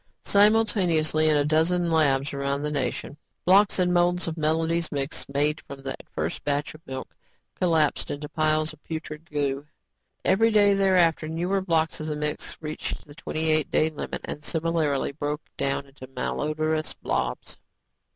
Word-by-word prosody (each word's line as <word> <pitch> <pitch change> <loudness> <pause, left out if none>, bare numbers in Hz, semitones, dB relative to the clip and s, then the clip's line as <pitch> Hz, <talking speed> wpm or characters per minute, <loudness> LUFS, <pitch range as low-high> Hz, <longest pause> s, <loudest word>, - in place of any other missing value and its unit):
Simultaneously, 190 -7 +3
in 150 - +4
a 145 - +2
dozen 165 +3 +2
labs 140 -3 +2
around 140 +1 -1
the 150 - -1
nation, 140 0 -2 0.3
blocks 195 +3 +5
and 180 -1 +2
molds 175 0 +2
of 160 - -3
Melody's 160 +1 +1
Mix 140 0 -3
made 145 +2 0
from 135 -1 -9
that 135 -1 -5
first - - -3
batch 145 0 -1
of 155 - -14
milk, 130 0 -7 0.4
collapsed 160 -5 +1
into 145 +1 -4
piles 155 0 +1
of 155 - -19
putrid 160 0 -7
goo. 145 -1 -2 0.6
Every 225 +4 +4
day 205 -2 +5
thereafter, 180 -5 +3
newer 175 +5 -1
blocks 165 -3 0
of 155 - -5
the 150 - -2
mix 150 0 -3
reached 155 0 -5
the 145 - -13
twenty 160 0 -1
eight 155 -2 +2
day 160 +1 +2
limit 155 - -5
and 150 - -6
similarly 160 -4 0
broke 145 +1 -3
down 140 0 -1
into 135 -1 -12
malodrous 155 +3 -2
blobs. - - -3
155 Hz, 160 wpm, -26 LUFS, 145-170 Hz, 0.6 s, blocks